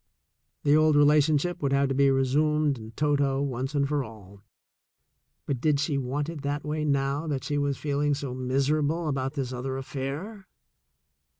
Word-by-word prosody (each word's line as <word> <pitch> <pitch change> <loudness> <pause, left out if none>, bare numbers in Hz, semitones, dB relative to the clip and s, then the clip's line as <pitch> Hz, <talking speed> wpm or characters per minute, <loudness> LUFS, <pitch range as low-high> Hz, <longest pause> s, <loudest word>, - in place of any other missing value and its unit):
The 145 +1 +4
old 155 -1 +4
relationship 150 +3 +3
would 140 -1 0
have 140 0 +3
to - - 0
be 140 +1 +4
resumed 145 +1 +2
in 110 0 -9
toto, 140 -2 +1
once 135 0 -3
and 140 -1 +2
for 145 -1 0
all, 100 -3 -13 1.0
but 135 -4 -3
did 150 -3 +2
she 145 -1 0
want 140 +3 -2
it 165 -3 -6
that 145 +1 -2
way 150 +1 -2
now 140 +1 0
that 140 -4 -2
she 145 -1 -1
was 140 -2 0
feeling 145 0 0
so 140 -3 -5
miserable 145 +5 0
about 135 -2 -2
this 130 -3 -3
other 130 +2 -3
affair 145 +10 -5
140 Hz, 170 wpm, -27 LUFS, 135-150 Hz, 1.0 s, The